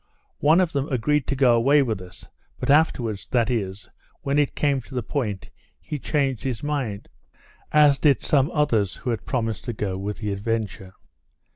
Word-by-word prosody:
One 155 +4 +5
of 180 -3 +2
them 140 -1 -2
agreed 135 +3 +1
to 135 - -1
go 130 -3 +4
away 140 +5 +4
with 110 -7 -3
us; 90 0 -12 0.3
but - - 0
afterwards, 125 -9 +1
that 120 -2 +1
is, 100 -4 -3 0.4
when 140 +1 +1
it 145 - 0
came 140 -3 +1
to 130 +3 -12
the 125 - -1
point, 105 -6 -3 0.3
he 150 - -6
changed 135 -5 -1
his 130 -3 -3
mind; 135 -9 -3 0.6
as 150 -2 +5
did 145 -3 +3
some 145 -2 +3
others 130 - +1
who 125 - -3
had 110 -6 -4
promised 115 -4 -2
to 120 - -3
go 95 -3 -3
with 100 +1 -4
the 105 -3 -3
Adventure. 100 -2 -3
125 Hz, 180 wpm, -24 LUFS, 105-145 Hz, 0.6 s, One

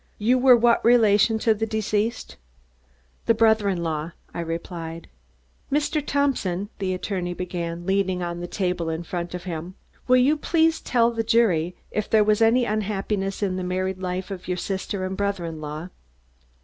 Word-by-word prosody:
"You 245 +5 +2
were 250 -1 +7
what 235 0 +3
relation 225 -2 +5
to 225 - +5
the 220 +1 -2
deceased?" 220 +1 -2 0.9
"The 230 - +4
brother 220 -2 +3
in 175 -3 -1
law," 160 0 -3 0.2
I - - -5
replied. 165 0 -5 0.6
"Mr. 295 +1 0
Thompson," 230 -10 0
the 185 -1 -1
attorney 180 -2 -3
began, 175 -1 -4
leaning 190 -1 0
on 170 0 -4
the 175 - -4
table 180 -3 -2
in 160 +1 -3
front 175 +1 -4
of 180 - -6
him, 175 0 -6 0.3
"will 255 0 +6
you 275 +5 +4
please 320 +1 +2
tell 235 -1 +2
the 230 -1 -1
jury 205 -7 +2 0.2
if 215 - -2
there 220 -1 +5
was 215 +1 +2
any 235 +2 +4
unhappiness 205 -2 -2
in 185 -2 0
the 185 - -3
married 185 +1 -2
life 185 +1 -4
of 185 -2 -7
your 180 -1 -1
sister 190 +1 -3
and 190 0 -3
brother 200 -3 -1
in 160 -2 -6
law?" 155 +3 -6
195 Hz, 175 wpm, -24 LUFS, 175-225 Hz, 0.9 s, were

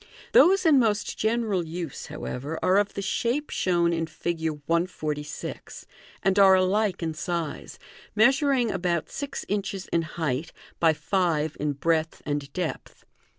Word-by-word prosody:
Those 385 -5 +6
in 300 -4 +6
most 215 -4 0
general 220 -4 0
use, 165 -2 -6
however, 145 +6 -5
are 185 +1 +4
of 205 0 -1
the 200 - -3
shape 240 +8 -1
shown 170 -2 +1
in 165 -1 -1
Fig. 160 0 -2 0.2
146, 155 -3 -3 0.4
and 195 +1 +3
are 190 -1 +8
alike 190 0 +1
in 160 -1 -1
size, 170 -2 -4 0.4
measuring 265 0 +3
about 175 -3 -1
six 280 -1 -5
inches 195 -1 -2
in 170 - +3
height, 155 -2 -3 0.3
by 165 -2 +4
five 160 -3 0
in 150 -1 0
breadth 160 +2 -1
and 145 -1 -3
depth. 175 -1 -5
175 Hz, 140 wpm, -26 LUFS, 160-210 Hz, 0.4 s, are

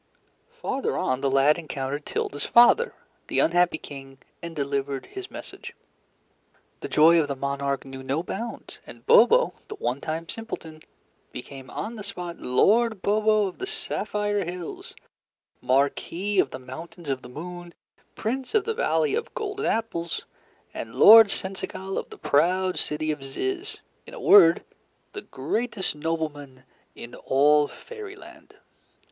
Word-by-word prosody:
Farther 470 - -3
on, 130 -8 -1
the 140 - +1
lad 135 +4 +4
encountered 145 -2 -5
Tilda's 145 0 -3
father, 325 - +5 0.3
the - - -3
unhappy 175 0 +3
King, 135 -3 -11 0.2
and 170 -1 -7
delivered 140 -1 -2
his 385 0 -8
message. - - -9 1.0
The - - -5
joy 165 +2 +6
of 150 - -2
the 140 - -3
monarch 140 0 -2
knew 135 0 -8
no 135 +5 -2
bounds, 230 +6 -6
and - - -13
Bobo, 475 +1 +6
the 425 - -7
one 140 - -3
time 165 +1 -4
simpleton, 160 -9 -7 0.5
became 130 +1 -9
on 225 +2 -5
the 210 - -7
spot 180 -4 -7
Lord 220 - +2
Bobo 215 0 +3
of 185 - -6
the 380 - -4
Sapphire 210 - -2
Hills, 175 -1 -7 0.7
Marquis 165 +9 0
of 135 - +3
the - - -7
Mountains 160 +6 -10
of 135 -2 -2
the 125 - -11
Moon, 175 +5 -8 0.4
Prince 260 - -3
of 430 - +3
the 450 - -1
Valley 465 -1 +1
of 460 +2 -2
Golden 420 -3 -3
Apples, 170 -7 -2 0.5
and 115 0 -7
Lord 220 0 +9
Seneschal 190 0 -4
of - - -8
the - - -11
proud 180 +5 +1
City 155 +1 -1
of 150 -2 -5
Zizz 390 - -4 0.3
in - - -10
a - - -8
word, 175 - +7 0.5
the 405 - -6
greatest 205 - -3
nobleman 150 -4 -4 0.3
in 120 - -10
all 145 +2 +3
Fairyland. 425 - -12
170 Hz, 145 wpm, -25 LUFS, 140-225 Hz, 1.0 s, Lord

